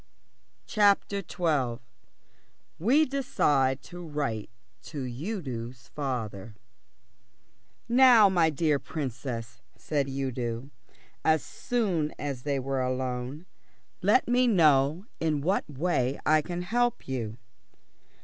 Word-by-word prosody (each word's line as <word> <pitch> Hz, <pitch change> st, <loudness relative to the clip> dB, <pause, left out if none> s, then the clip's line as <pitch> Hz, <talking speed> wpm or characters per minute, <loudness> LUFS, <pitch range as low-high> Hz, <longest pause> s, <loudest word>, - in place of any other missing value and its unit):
CHAPTER 205 Hz, -1 st, +3 dB
XII 150 Hz, -10 st, -1 dB, 1.0 s
WE 265 Hz, -, +4 dB
DECIDE 145 Hz, -, +1 dB
TO 175 Hz, 0 st, -9 dB
WRITE 145 Hz, -9 st, -3 dB, 0.3 s
TO 145 Hz, -4 st, -6 dB
UDO'S 125 Hz, -, -5 dB
FATHER 115 Hz, -7 st, -4 dB, 1.3 s
"Now, 240 Hz, -3 st, +7 dB
my 175 Hz, -4 st, +3 dB
dear 150 Hz, -1 st, +1 dB
Princess," 125 Hz, -6 st, -5 dB, 0.2 s
said 145 Hz, -3 st, -1 dB
Udo, 130 Hz, -1 st, -3 dB, 0.5 s
as 160 Hz, -1 st, +3 dB
soon 190 Hz, -11 st, -1 dB
as 140 Hz, -4 st, -4 dB
they 140 Hz, +1 st, -1 dB
were 135 Hz, 0 st, -1 dB
alone. 130 Hz, +4 st, -3 dB, 0.6 s
"Let 205 Hz, +7 st, +3 dB
me 250 Hz, +1 st, +3 dB
know 155 Hz, -, +4 dB
in 155 Hz, -3 st, 0 dB
what 185 Hz, +4 st, 0 dB
way 140 Hz, -3 st, 0 dB
I 155 Hz, 0 st, +5 dB
can 175 Hz, +3 st, -4 dB
help 240 Hz, +5 st, 0 dB
you." 115 Hz, -4 st, -3 dB
145 Hz, 100 wpm, -28 LUFS, 130-180 Hz, 1.3 s, Now